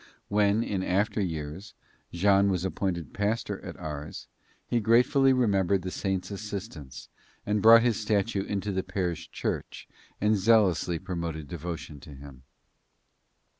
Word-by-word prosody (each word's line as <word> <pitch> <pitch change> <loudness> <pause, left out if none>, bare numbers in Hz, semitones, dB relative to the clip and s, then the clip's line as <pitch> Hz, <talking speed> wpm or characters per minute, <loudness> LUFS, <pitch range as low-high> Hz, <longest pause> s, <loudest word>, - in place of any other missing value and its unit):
When, 105 +1 +2
in 95 -4 -2
after 100 +4 0
years, 80 +1 -5 0.4
Jean 100 +2 +3
was 95 -1 -1
appointed 90 -5 -3
pastor 105 +3 -2
at - - -8
Ars, 75 0 -7 0.4
he 120 - 0
gratefully 125 +5 +4
remembered 100 -7 +2
the 90 - -4
saint's 95 0 -3
assistance 100 - -7 0.4
and 105 0 0
brought 115 +2 +8
his 120 -3 +1
statue 105 -2 0
into 100 0 -3
the 95 -1 -1
parish 90 -3 -3
church - - -4 0.3
and 105 +1 +3
zealously 95 -5 +3
promoted 85 -4 -5
devotion 80 -1 -6
to 70 0 -12
him. 70 -1 -12
95 Hz, 130 wpm, -28 LUFS, 85-105 Hz, 0.4 s, brought